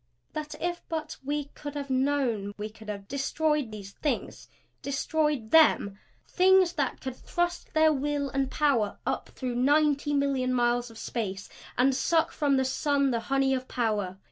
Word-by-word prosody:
That 305 -1 -5
if 345 0 -2
but 315 -2 -4
we 290 +1 -2
could 290 0 -7
have 280 -2 -4
known 255 -7 0
we 210 +1 -4
could 215 0 -13
have 200 -1 -6
destroyed 295 +1 0
these 200 -2 -8
Things 295 +7 -3 0.3
Destroyed 280 -4 -1
Them? 205 -11 +5 0.3
Things 375 -1 +4
that 280 -4 -1
could 260 -1 -5
thrust 350 +4 -3
their 315 0 +5
will 285 0 -1
and 270 0 0
power 265 -10 +1
up - - -2
through 255 -2 -4
ninety 290 +3 +2
million 270 -3 +1
miles 240 0 +1
of 225 - -13
space 205 -5 -4 0.3
and 265 +2 +4
suck 320 +5 +2
from 285 -3 +1
the 265 - +2
sun 280 +1 +1
the 235 - 0
honey 270 0 +2
of 255 -1 -2
power! 210 -6 -1
275 Hz, 165 wpm, -28 LUFS, 240-300 Hz, 0.3 s, Them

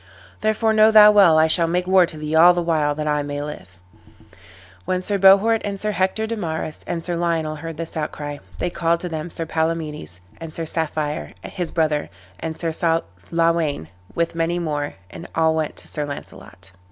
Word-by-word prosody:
Therefore 215 +1 +1
know 215 0 +6
thou 210 -1 +8
well 195 -6 +6
I 160 - +5
shall 165 +1 +3
make 180 +2 0
war 185 -1 +4
to 160 - -8
thee 150 0 -5
all 175 +2 +7
the 175 - 0
while 155 -3 +1
that 150 0 -3
I 150 0 +1
may 145 0 -4
live." 120 -12 -8 1.1
When 185 0 -1
Sir 200 +1 -1
Bohort, 200 +4 +5
and 200 -1 -4
Sir 215 +1 -1
Hector 195 +3 0
de 230 +1 -3
Marys, 160 -5 -4
and 170 -1 -3
Sir 175 0 -2
Lionel 165 -2 -1
heard 165 0 -7
this 165 0 -6
outcry, 145 -2 -4 0.2
they 175 - -2
called 170 0 0
to 180 - -4
them 160 +1 -5
Sir 165 0 -4
Palamedes, 160 - -3 0.2
and 165 -1 -8
Sir 165 - -3
Saffire 155 -1 -2
his 175 -3 -4
brother, 155 -3 0 0.3
and 160 +6 -5
Sir 165 -1 -2 0.6
Lawayn, 165 - 0 0.3
with 170 0 0
many 165 +1 -1
more, 150 -4 -3 0.2
and 170 - -9
all 160 0 +3
went 155 -1 -2
to - - -9
Sir 150 - -3
Launcelot. 140 -8 -9
165 Hz, 190 wpm, -21 LUFS, 155-180 Hz, 1.1 s, thou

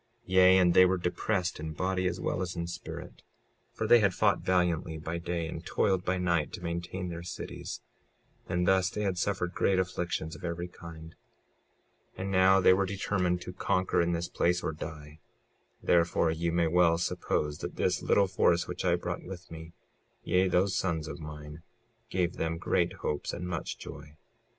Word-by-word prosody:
56:16 - - -34
Yea, 95 0 +7
and 90 -2 +4
they 95 - +8
were 95 +1 +1
depressed 90 0 -1
in 80 0 -5
body 90 +3 0
as 90 - -2
well - - -1
as 90 -1 -3
in 85 -1 -2
spirit, 85 - -8 0.5
for - - -3
they 120 - +7
had 100 -4 +2
fought - - +3
valiantly 90 -3 0
by 80 +2 -4
day 85 -1 -3
and - - -6
toiled 95 -2 +1
by 95 0 0
night 85 -4 0
to - - -7
maintain 85 +2 -4
their 85 0 -5
cities; 85 - -6 0.7
and 90 0 0
thus 95 -1 +4
they 105 - -3
had 95 -2 0
suffered 90 -2 -1
great 95 - +2
afflictions 90 -3 -2
of - - -13
every 85 0 -3
kind. 80 -2 -11 1.0
56:17 - - -10
And 95 +1 -3
now 95 +1 +5
they 95 - +6
were 95 +1 +1
determined 90 -2 0
to 90 - -7
conquer 90 -1 +1
in 85 0 +1
this 85 +1 -2
place 90 +1 +1
or - - -1
die; 75 -1 -8 0.6
therefore 85 -1 +3
you 85 +1 -1
may 85 0 +2
well 85 0 +4
suppose 75 -3 -1
that - - -5
this - - 0
little 100 - +3
force 85 -2 +2
which - - -5
I 90 -2 +3
brought 85 0 -4
with 90 -1 -10
me, 80 0 -9 0.5
yea, 90 +2 +2
those 95 +1 +2
sons 80 -5 -1
of 80 - -7
mine, 75 0 -9 0.5
gave 90 -1 -1
them 80 0 -1
great 85 0 +1
hopes 75 - -3
and 90 - -4
much 85 -4 -4
joy. 75 - -10
90 Hz, 190 wpm, -30 LUFS, 85-95 Hz, 1.0 s, they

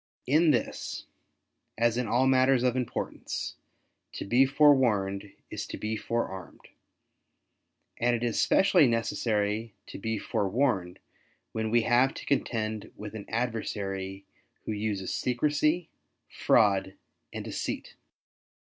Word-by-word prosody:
In 155 +5 +4
this, - - -1 0.7
as 115 0 +2
in 125 -1 -1
all 120 +4 +2
matters 130 -1 +4
of 125 -1 +2
importance, 125 -2 -3 0.7
'Ho - - -4
be 125 +6 +4
forewarned 110 -9 +3 0.2
is - - -4
to - - -6
be 110 +1 -2
forearmed," 95 -5 -4 1.3
and 120 0 +2
it 120 - -3
is 120 -2 +1
specially 190 -6 +5
necessary 110 -2 -1
to - - -9
be 110 +2 -2
forewarned 100 -3 0 0.5
when 110 0 -2
we 120 +1 +3
have 125 +4 +3
to - - -8
contend 110 -6 -1
with 105 0 -8
an 110 -2 -8
adversary 100 -5 -3 0.4
who - - -3
uses 105 -3 -2
secrecy, 150 +6 +1 0.4
fraud 95 -2 +2 0.4
and - - -6
deceit. - - -4
115 Hz, 120 wpm, -28 LUFS, 105-130 Hz, 1.3 s, specially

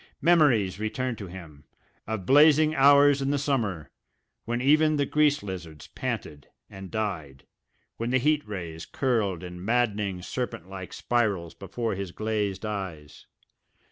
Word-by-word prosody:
Memories 135 - +3
returned 120 +3 -3
to 100 - -6
him, 85 -5 -11 0.4
of 110 -4 -4
blazing 150 - +5
hours 140 0 +6
in 135 - 0
the 145 - +1
summer, 110 - -2 0.5
when 120 +1 -2
even 155 +4 +4
the 145 -1 +1
grease 150 -2 +2
lizards 90 -6 -7
panted 75 -2 -5 0.2
and 95 -1 -9
died, 90 -12 -4 0.5
when 115 +1 -2
the 130 - +3
heat 150 +3 +2
rays 85 -5 -6
curled 105 - -1
in 90 0 -8
maddening 105 -4 0
serpent 120 -6 -4
like 95 -1 -8
spirals 100 -9 -1
before 110 +4 -4
his 95 -2 -5
glazed 105 -1 -2
eyes. 95 -8 -6
110 Hz, 140 wpm, -26 LUFS, 95-135 Hz, 0.5 s, hours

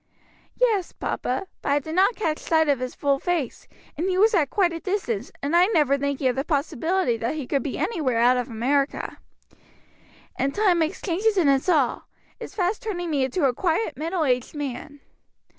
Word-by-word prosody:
"Yes, 435 -8 +1
papa, 255 +10 -3 0.2
but - - -1
I - - +3
did 315 +2 -4
not 390 +6 +3
catch 320 -7 -1
sight 320 -1 +2
of 280 -3 +2
his 255 0 -4
full 280 -1 +1
face, 335 -8 -2 0.3
and 350 +5 -1
he 370 - 0
was 440 +4 +4
at 310 -8 +2
quite 360 -4 +2
a 330 - -4
distance, 295 - -2
and 290 +4 0
I 355 +2 +6
never 300 -10 +3
thinking 280 -1 -1
of 250 - +1
the 270 - -1
possibility 300 -1 0
that 230 +6 -2
he 300 -4 -4
could 275 +2 0
be 265 - -4
anywhere 285 - -1
out 245 +2 +5
of 250 +1 -2
America." 275 +5 -1 1.2
"And 275 +1 -1
time 390 -5 +3
makes 325 +3 -1
changes 405 +4 +1
in 345 -6 +3
us 275 +5 +2
all 290 -8 +1 0.3
is - - -9
fast 385 +1 0
turning 350 -6 -3
me 280 -3 +1
into 280 +4 0
a 260 - +3
quiet 330 - 0
middle 325 +4 -1
aged 250 +1 0
man." 285 0 -6
305 Hz, 195 wpm, -24 LUFS, 270-360 Hz, 1.2 s, I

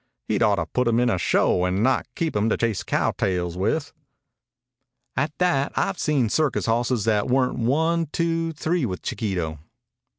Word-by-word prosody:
"He'd - - 0
ought - - +4
to - - -2
put 125 -1 -1
him 115 0 +3
in 125 -1 +2
a 95 - 0
show 90 +1 +2
and 90 +3 0
not 130 +2 +2
keep 165 -6 -2
him 105 +2 +2
to - - +1
chase 115 -4 0
cow - - 0
tails 90 -2 -1
with." 110 - -1 1.2
"At 145 +4 0
that, 175 -6 +1
I've 195 - 0
seen 145 -6 +1
circus 145 +3 0
hosses 120 -1 0
that 105 -2 +1
weren't 125 0 +1
one 160 +7 +1
two 165 +1 -1
three 160 +1 -1
with 95 -7 -3
Chiquito. 90 - -3
125 Hz, 175 wpm, -24 LUFS, 105-155 Hz, 1.2 s, ought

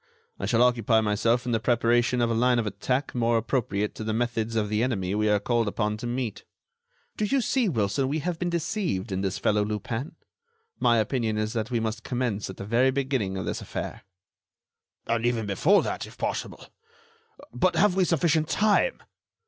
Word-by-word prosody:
I 95 - -2
shall 115 +2 +4
occupy 115 -2 +3
myself 115 +3 +1
in 125 - -1
the 115 - +2
preparation 120 +1 +2
of 120 -1 +2
a - - +1
line 125 +2 +3
of 115 - 0
attack 125 +7 -2
more 115 -1 +2
appropriate 105 -3 -1
to - - -7
the 110 0 -1
methods 115 -1 -1
of 110 -2 +1
the 105 +1 0
enemy 100 -7 -1
we 105 +1 +1
are 105 0 +3
called 115 0 0
upon 105 +1 -1
to 120 +2 -5
meet. 120 -4 -3 0.7
Do - - -1
you 275 +6 +2
see, 245 -2 +1
Wilson, 120 - 0
we 145 +3 -1
have 170 +2 -3
been 180 - -1
deceived 170 - -2
in 95 0 -1
this 95 -1 -1
fellow 105 0 +2
Lupin. 115 +6 -4 0.6
My 120 - +4
opinion 110 0 0
is 110 +1 -1
that 110 -1 -2
we 120 -2 0
must 110 +1 -3
commence 120 -6 -2
at 95 - -8
the 100 - -6
very 120 +5 +3
beginning 130 -8 -1
of 95 - -3
this - - -3
affair." - - -5 1.0
"And 115 0 0
even 120 -2 0
before 145 - +3
that, - - -3
if - - -15
possible. - - -4 0.9
But 185 - +1
have 205 -1 +4
we 190 - +3
sufficient 160 -2 +1
time?" 215 - +2
115 Hz, 195 wpm, -26 LUFS, 105-130 Hz, 1.0 s, shall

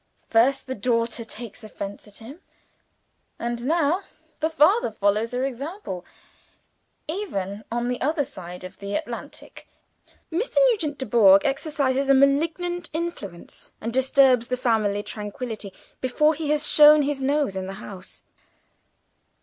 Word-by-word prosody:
First, 250 +5 +3
the 260 - -4
daughter 230 0 -1
takes 230 0 -9
offense 205 -1 -7
at 205 - -14
him, 260 +9 -11 1.0
and 235 0 -3
now 330 +3 +2 0.4
the 315 - +1
father 320 - +4
follows 210 +2 +1
her 250 +1 -1
example. 275 - -5 1.0
Even 215 - -4
on 240 +1 -1
the 250 0 -3
other 295 +2 +1
side 180 -10 -9
of 185 +1 -10
the 200 0 -4
Atlantic, 235 0 -7 0.6
Mr. 380 +10 -2 0.2
Nugent 310 -10 -2
Dubourg 205 -7 +5
exercises 275 -1 0
a 275 - +7
malignant 325 +6 +1
influence, 310 - -6
and 230 +1 -4
disturbs 260 -2 +4
the 250 - -1
family 215 -4 +1
tranquillity 210 0 -6 0.3
before 300 +5 +2
he 305 -1 -4
has 300 0 +2
shown 300 0 +7
his 280 -1 -2
nose 280 -5 +1
in 190 0 -4
the 195 - -5
house!" 195 -2 -9
255 Hz, 135 wpm, -24 LUFS, 215-300 Hz, 1.0 s, a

